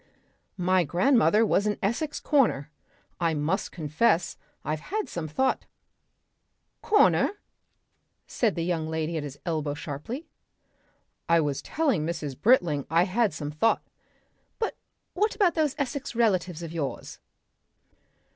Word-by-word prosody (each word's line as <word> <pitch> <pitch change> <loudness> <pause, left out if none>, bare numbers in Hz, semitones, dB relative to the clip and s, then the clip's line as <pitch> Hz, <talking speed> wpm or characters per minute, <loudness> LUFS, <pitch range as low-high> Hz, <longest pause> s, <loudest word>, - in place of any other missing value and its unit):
My 185 0 +3
grandmother 225 - +3
was 205 -1 +2
an 210 - 0
Essex 260 +9 -1
Corner, 225 - +2 0.5
I 165 -2 +1
must 155 +7 -1
confess 165 +3 +1 0.3
I've 155 0 -1
had 425 - -3
some 165 -2 -4
thought 260 - 0 0.6
" - - -50
"Corner?" 415 -1 +4 0.9
said 225 -5 0
the 165 - -1
young 165 -3 -1
lady 160 +1 -2
at 160 - -1
his 145 -1 -7
elbow 155 -4 -1
sharply. 165 - -6 1.0
"I 170 0 +5
was 145 -3 -1
telling 275 - 0
Mrs. 155 -4 -3
Britling 165 - +3
I 165 +2 +4
had 210 +4 +1
some 145 -1 -5
thought 190 +10 +2 0.4
" - - -44
"But 445 - -1 0.6
about 380 -5 +3
those 305 -4 +1
Essex 280 -2 -3
relatives 185 -7 +1
of 165 -1 -6
yours?" 155 -5 -4
175 Hz, 130 wpm, -27 LUFS, 155-235 Hz, 1.0 s, I